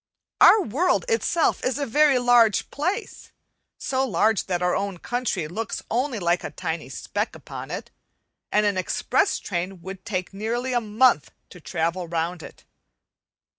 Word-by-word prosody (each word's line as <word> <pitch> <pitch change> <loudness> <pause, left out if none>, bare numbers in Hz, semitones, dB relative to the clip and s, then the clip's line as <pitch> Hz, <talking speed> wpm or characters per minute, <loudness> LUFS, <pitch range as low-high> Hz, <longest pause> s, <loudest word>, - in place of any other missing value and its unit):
Our 435 - +7
world 325 - +1
itself 455 -8 +1
is 260 +1 0
a 285 - -1
very 290 +2 +4
large 245 -3 +4
place, 370 +10 -3 0.5
so 265 0 -1
large 215 -2 +1
that 180 -1 -1
our 180 0 +2
own 195 -1 -2
country 235 -6 -2
looks 225 +7 -4
only 250 +1 0
like 175 -2 +1
a - - -4
tiny 170 -2 -4
speck - - -3
upon - - -8
it, - - -6 0.6
and 210 0 +3
an 200 -2 +1
express 395 - +1
train 180 -1 -4
would 190 0 -8
take 185 -4 -3
nearly 235 +5 -2
a 240 - +2
month 215 - +3 0.2
to 180 - -13
travel 170 +2 -2
round 170 +1 -2
it. - - -12
210 Hz, 155 wpm, -24 LUFS, 180-255 Hz, 0.6 s, Our